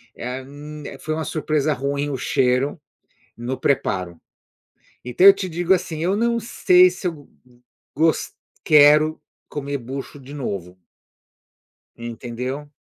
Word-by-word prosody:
eh, 125 +2 -5
hum, 150 +2 -10 0.2
foi 155 - -3
uma 160 0 -3
surpresa 155 -1 0
ruim 140 +2 -2
o 140 - -2
cheiro 130 +4 +1 0.6
no 120 +3 -4
preparo. 90 -10 -1 0.9
Então, 125 +9 +2
eu 200 - +11
te 190 -1 -5
digo, 175 +2 +2
assim, 175 -4 -2
eu 185 +3 +1
não 235 +2 +1
sei 185 -5 +5
se 180 0 -4
eu, 175 - -2
go 145 -2 -16 0.7
gos 160 +2 +1 0.3
quero 150 +1 +5 0.3
comer 140 -1 -4
bucho 135 +3 -7
de 135 +1 -12
novo 95 -9 -5 1.2
entendeu? 120 +4 -6
145 Hz, 130 wpm, -22 LUFS, 130-160 Hz, 1.2 s, eu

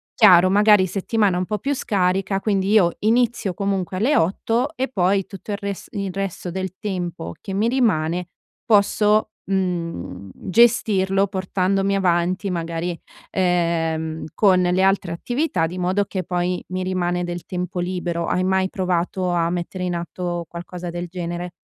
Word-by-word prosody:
Chiaro, 185 -4 +7
magari 205 -1 +5
settimana 200 0 +1
un 180 - -1
po' 210 +2 -3
più 280 +2 -1
scarica, 195 -3 0
quindi 195 -2 0
io 195 -6 +5
inizio 230 -3 +1
comunque 190 -1 -2
alle 250 +10 +2
8 230 - 0
e 260 +1 0
poi 195 -3 +1
tutto 195 +2 -9
il 200 - -1
res 200 -2 -5
il 200 -3 -3
resto 195 -2 -4
del 190 0 -4
tempo 175 - -4
che 195 - -6
mi 210 +4 +1
rimane, 180 -9 +1 0.4
posso, 210 -1 +3
mhmm, 170 - -3
gestirlo 195 -3 +3
portandomi 195 0 0
avanti 185 +1 +1
magari, 170 0 -3 0.3
ehm, 165 -3 0
con 190 -3 +4
le 180 +1 +2
altre 195 -3 +2
attività, 240 - -1
di 175 +3 -7
modo 185 +3 +1
che 190 -1 -4
poi 180 0 -1
mi 185 0 -2
rimane 180 -1 -1
del 175 0 -5
tempo 180 0 -4
libero. 175 -1 -2
Hai 185 - +1
mai 190 0 +1
provato 180 0 -1
a 170 -1 +1
mettere 180 +1 -3
in 175 -1 -1
atto 175 0 -4
qualcosa 175 +1 -7
del 175 +1 -4
genere? 175 0 -5
185 Hz, 150 wpm, -22 LUFS, 175-200 Hz, 0.4 s, Chiaro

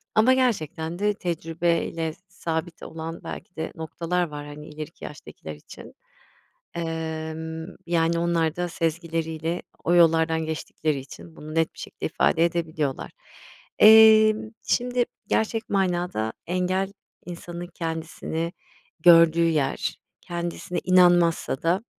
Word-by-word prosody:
Ama 230 +4 +6
gerçekten 175 - -1
de 210 0 +2
tecrübe 170 -2 -1
ile 160 -1 -3
sabit 170 -2 -4
olan 165 +1 -7
belki - - -8
de 160 0 -4
noktalar 170 +2 -2
var, 145 -1 -7
hani, 150 +1 -9
ileriki 155 +2 -9
yaştakiler 80 - -9
için. 75 - -13 0.8
Imm, 160 0 -4
yani 170 0 +2
onlar 170 -2 +1
da 175 0 -1
sezgileriyle 165 0 -2 0.2
o 175 - +3
yollardan 160 -1 +4
geçtikleri 155 -2 -2
için 160 +4 -11
bunu 155 +1 -9
net 165 0 +1
bir - - -21
şekilde - - -6
ifade 165 - +2
edebiliyorlar. 160 -5 -2 0.7
Emm, 220 0 +7 0.2
şimdi 245 0 +1 0.2
gerçek 220 0 0
manada 175 - 0
engel, 185 +2 0 0.3
insanın 175 0 -7
kendisini 165 0 -4 0.5
gördüğü 165 0 +6
yer, 150 -4 -1 0.2
kendisine 175 +1 -4
inanmazsa 175 -6 +4
da 180 +6 +1
165 Hz, 115 wpm, -25 LUFS, 160-180 Hz, 0.8 s, Emm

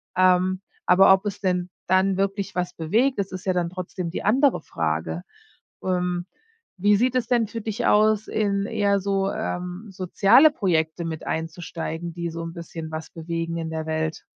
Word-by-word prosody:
ähm. 185 +1 +3 0.3
Aber 190 +2 +7
ob 190 +2 +1
es 205 0 -4
denn 180 -2 0 0.2
dann 190 +1 +3
wirklich 195 0 -2
was 180 0 -1
bewegt, 220 +11 +1
das 195 -1 -2
ist 185 - -6
ja 190 - +2
dann 175 -1 0
trotzdem 180 -1 -5
die 175 - -5
andere 260 +6 +3
Frage. 80 +1 -2 0.6
Ähm, 180 -1 -1 0.5
wie 205 +2 +4
sieht 250 +4 +1
es 245 - +1
denn 240 -3 +2
für 230 - -5
dich 220 +3 -3
aus, 215 0 +4
in 200 -2 0
eher 205 -3 +1
so, 195 0 0
ähm, 180 +4 -4
soziale 195 - +5
Projekte 170 - 0
mit 160 -1 -5
einzusteigen, 165 0 -4
die 170 0 -3
so 165 +1 -6
'n 165 - -5
bisschen 165 -2 -7
was 160 0 -6
bewegen 165 0 -4
in 160 -1 -4
der 160 0 -4
Welt? 160 0 -2
185 Hz, 175 wpm, -24 LUFS, 165-200 Hz, 0.6 s, Aber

